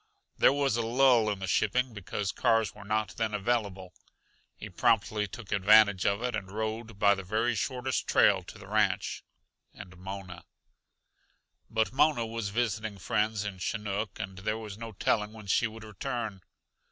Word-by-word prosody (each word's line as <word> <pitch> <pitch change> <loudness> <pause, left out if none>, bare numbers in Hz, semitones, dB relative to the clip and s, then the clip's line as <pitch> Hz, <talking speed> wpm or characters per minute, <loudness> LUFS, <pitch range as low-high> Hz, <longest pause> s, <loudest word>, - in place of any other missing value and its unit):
There - - +5
was 140 -4 +1
a - - +1
lull 120 -1 +4
in 105 - -1
the 95 - -5
shipping 125 +6 +1
because 100 0 -3
cars 115 -1 +2
were 105 - -12
not 105 -2 -2
then 110 -2 -1
available. 100 -4 -2 0.6
He - - -8
promptly 105 -1 +1
took 105 +1 -10
advantage 105 0 +5
of 100 +4 0
it 125 -2 -1
and 95 -3 -5
rode 110 +1 -4
by 100 0 +5
the 95 - -4
very 110 +6 0
shortest 125 +4 -2
trail - - +4
to - - -11
the - - -12
ranch - - 0 0.5
and 90 0 -11
Mona. 95 -2 -8 1.2
But 110 +1 0
Mona 145 -4 +3
was 115 -2 -4
visiting 110 -1 -2
friends 105 +2 -1
in 100 -2 -5
Chinook, 105 +1 -3
and 95 -1 -6
there 110 +3 -2
was 105 -3 -7
no 115 +1 -7
telling 105 +2 0
when 110 -2 -11
she 100 +4 +2
would 110 0 -11
return. 110 -1 -5
110 Hz, 165 wpm, -29 LUFS, 100-115 Hz, 1.2 s, There